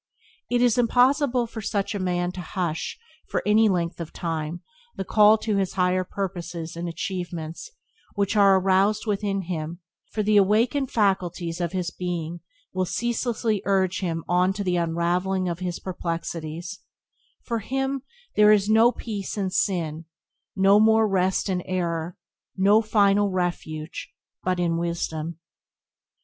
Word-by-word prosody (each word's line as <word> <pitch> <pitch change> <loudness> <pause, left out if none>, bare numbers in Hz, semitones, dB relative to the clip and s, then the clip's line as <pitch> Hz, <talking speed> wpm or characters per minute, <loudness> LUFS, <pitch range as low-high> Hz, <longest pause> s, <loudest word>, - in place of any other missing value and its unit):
It 245 0 +2
is 245 -1 +3
impossible 250 +1 +3
for 225 -1 -7
such 205 0 -1
a 205 - -3
man 175 -1 -1
to 180 - -7
hush, 175 -2 -3 0.3
for - - -1
any 215 +1 +5
length 170 -2 -1
of 165 - -6
time, 165 0 -4 0.3
the 195 - -4
call 210 +2 +6
to 210 -3 0
higher 185 0 +1
purposes 175 -4 -5
and 170 +1 -4
achievements 170 - -5 0.5
which 200 -1 0
is - - -1
aroused 195 +1 +4
within 200 -2 -1
him, 170 -1 -4 0.3
for 215 - -1
the 210 0 +3
awakened 230 +7 +3
faculties 180 -5 0
of 170 0 -2
his 180 -2 -2
being 175 -2 -4 0.3
will 185 0 0
ceaselessly 230 0 -1
urge 190 -2 +1
him 165 -4 -2
on 180 +2 +2
to 200 +1 -3
the 180 -2 0
unravelling 175 +3 0
of 170 -1 -3
his 180 -2 -3
perplexities; 170 -1 -5 0.6
for 230 -1 -2
him 270 +4 -2 0.3
there 210 0 +6
is 205 -2 +4
no 220 +1 +5
more 240 - +5
peace 210 -3 -5
in 190 -2 -1
sin, 165 -5 -1 0.5
no 195 +2 +5
more 220 0 +5
rest 190 -1 +1
in 185 -2 -1
error, 170 -2 -3 0.4
no 200 +3 +5
final 205 -2 +3
refuge 175 -4 -3 0.3
but 185 -1 0
in 170 -1 +1
Wisdom. 170 -1 -3
185 Hz, 145 wpm, -25 LUFS, 175-210 Hz, 0.6 s, call